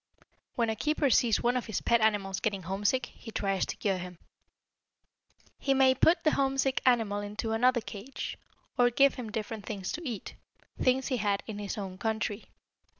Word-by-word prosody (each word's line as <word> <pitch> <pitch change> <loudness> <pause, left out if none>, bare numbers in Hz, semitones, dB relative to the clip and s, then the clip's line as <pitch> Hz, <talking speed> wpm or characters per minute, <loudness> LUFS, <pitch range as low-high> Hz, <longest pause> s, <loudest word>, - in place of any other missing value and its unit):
When 230 -2 +1
a - - -2
keeper 300 +3 +1
sees 230 -2 +3
one 245 +1 +2
of 250 - -2
his 220 - -1
pet 235 -1 +3
animals 200 -3 +1
getting 200 -3 -2
homesick, 205 +8 0
he 235 - -13
tries 195 -4 -1
to - - -4
cure 195 -3 -1
him. 180 -1 -8 1.4
He 275 -1 +1
may 265 -1 +5
put 325 +7 +3
the 310 - +4
homesick 270 -1 +1
animal 225 -5 +3
into 210 +2 -4
another 245 +2 +3
cage, 220 +5 -6 0.4
or 245 0 +6
give 275 +3 +4
him 235 -5 -6
different 215 -2 -5
things 195 -4 -4
to 335 - -4
eat 240 -9 -5 0.5
things 260 +1 +2
he 255 - 0
had 205 -2 0
in 210 -2 -6
his 205 0 -4
own 190 -2 -6
country. 220 -1 -2
225 Hz, 180 wpm, -30 LUFS, 205-255 Hz, 1.4 s, or